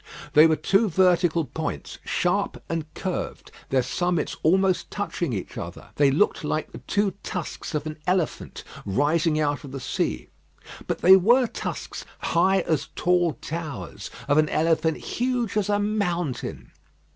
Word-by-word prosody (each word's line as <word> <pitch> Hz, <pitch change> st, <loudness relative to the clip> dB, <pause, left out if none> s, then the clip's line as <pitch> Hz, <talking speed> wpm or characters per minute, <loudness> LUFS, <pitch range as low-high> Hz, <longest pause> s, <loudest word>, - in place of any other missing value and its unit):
They 155 Hz, +2 st, +8 dB
were 160 Hz, -, +3 dB
two 195 Hz, +6 st, +2 dB
vertical 175 Hz, -2 st, +3 dB
points, -, -, -5 dB
sharp -, -, 0 dB
and 160 Hz, -2 st, -3 dB
curved 185 Hz, -2 st, -4 dB, 0.2 s
their 130 Hz, -1 st, +2 dB
summits 175 Hz, +5 st, -1 dB
almost 185 Hz, +1 st, +2 dB
touching 200 Hz, -6 st, -3 dB
each 100 Hz, -5 st, -5 dB
other. -, -, -8 dB
They 145 Hz, -1 st, +5 dB
looked 155 Hz, +8 st, +2 dB
like 155 Hz, +1 st, -2 dB
the -, -, -9 dB
two 200 Hz, +10 st, 0 dB
tusks 175 Hz, -3 st, -5 dB
of 150 Hz, 0 st, -1 dB
an 155 Hz, 0 st, -6 dB
elephant 180 Hz, -3 st, -1 dB, 0.2 s
rising 155 Hz, -, +1 dB
out 145 Hz, -1 st, 0 dB
of 140 Hz, -, -9 dB
the 135 Hz, -, -5 dB
sea; -, -, -2 dB, 0.6 s
but -, -, -2 dB
they 190 Hz, +2 st, +9 dB
were 240 Hz, +7 st, +5 dB
tusks, -, -, -5 dB
high 190 Hz, +3 st, +2 dB
as 160 Hz, -3 st, -1 dB
tall 175 Hz, -2 st, +2 dB
towers, 150 Hz, -, -6 dB, 0.2 s
of 145 Hz, +1 st, +4 dB
an 155 Hz, 0 st, +3 dB
elephant 160 Hz, 0 st, +2 dB
huge 245 Hz, -4 st, -2 dB
as 210 Hz, -2 st, +1 dB
a 205 Hz, -, +3 dB
mountain. 175 Hz, -, -2 dB
165 Hz, 150 wpm, -25 LUFS, 150-190 Hz, 0.6 s, they